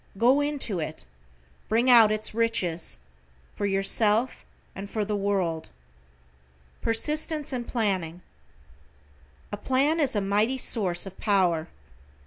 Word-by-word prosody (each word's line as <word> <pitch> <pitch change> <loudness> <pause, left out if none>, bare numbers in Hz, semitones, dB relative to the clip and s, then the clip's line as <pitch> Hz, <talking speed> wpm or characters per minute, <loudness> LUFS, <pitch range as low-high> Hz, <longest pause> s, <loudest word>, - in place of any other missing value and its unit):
Go 255 +7 +4
into 285 -10 -1
it, 155 0 -5 0.6
bring 230 +3 +2
out 230 -4 +7
its 215 0 -2
riches, 210 -7 0 0.6
for 205 - -2
yourself 210 +4 +1 0.3
and 195 +1 -8
for 215 -1 -2
the 210 0 -2
world. 195 -5 -1 1.1
=PERSISTENCE 300 +5 -1
AND 240 -2 -4
PLANNING=: 185 -7 -2 1.3
A 205 - -4
plan 275 +8 +1
is 275 -5 +1
a - - +2
mighty 210 +6 +1
source 195 -9 +2
of 190 -1 -11
power. 180 -6 +1
210 Hz, 115 wpm, -26 LUFS, 195-245 Hz, 1.3 s, out